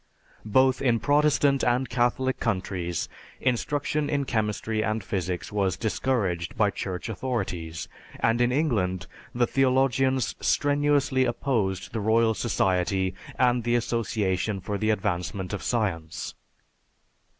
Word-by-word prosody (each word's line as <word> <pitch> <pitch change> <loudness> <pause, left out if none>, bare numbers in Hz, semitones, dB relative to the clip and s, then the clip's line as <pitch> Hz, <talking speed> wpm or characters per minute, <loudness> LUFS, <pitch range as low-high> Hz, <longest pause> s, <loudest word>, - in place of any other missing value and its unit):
Both 130 +4 +3
in 120 -4 +2
Protestant 145 +1 +3
and 125 +2 +2
Catholic 125 +2 0
countries 95 -5 -2 0.3
instruction 145 +3 0
in 140 -1 0
chemistry 110 -1 -1
and 110 -1 -1
physics 90 -2 -3
was 100 -3 0
discouraged 105 -7 -1
by 105 -2 +3
Church 95 0 -4
authorities, 90 - -3 0.3
and 115 +1 +2
in 120 0 +3
England 100 - 0 0.3
the 120 0 +3
theologians 130 -1 +2
strenuously 145 -2 +2
opposed 115 -6 -1
the 115 - -1
Royal 110 +2 +3
Society 95 -4 0 0.2
and 125 -1 +3
the 120 +1 +1
Association 110 -4 0
for 100 +2 -4
the 110 - +1
Advancement 95 -1 -1
of 105 - -3
Science. 85 -9 -2
115 Hz, 115 wpm, -26 LUFS, 95-130 Hz, 0.3 s, Both